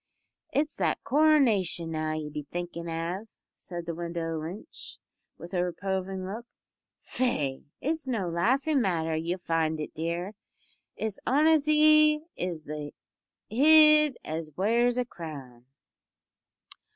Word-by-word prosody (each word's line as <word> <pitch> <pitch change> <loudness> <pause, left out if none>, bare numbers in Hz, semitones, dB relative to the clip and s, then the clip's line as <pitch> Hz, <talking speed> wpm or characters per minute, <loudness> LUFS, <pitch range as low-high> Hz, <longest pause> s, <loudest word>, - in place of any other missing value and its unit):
"It's 300 +1 0
that - - 0
caronation, 250 - +3
now, 155 -1 -2
ye'll 155 -1 -4
be 150 -1 -6
thinkin' 175 -1 -5
av?" 170 +6 -3 0.3
said 175 -2 -8
the 170 - -3
widow 165 -1 -3
Lynch, 175 +7 -8 0.4
with 175 +2 -11
a 180 -1 +1
reproving 190 +1 -3
look. 220 +5 -6 0.5
"Faix, 150 - -1 0.2
it's 310 0 -2
no 220 -8 -1
laughin' 260 - +1
matter 165 -6 0
ye'll 165 +3 -2
find 160 -3 -1
it, 150 - -5
dear. 170 +5 -3 0.6
It's 220 -2 -3
onaisy 305 +1 +5
is 175 -3 -4
the 150 -1 -6 0.5
hid 305 +3 +6
as 160 0 -4
wears 235 +5 +2
a 250 - +1
crown." 140 - -9
180 Hz, 120 wpm, -28 LUFS, 165-255 Hz, 0.6 s, hid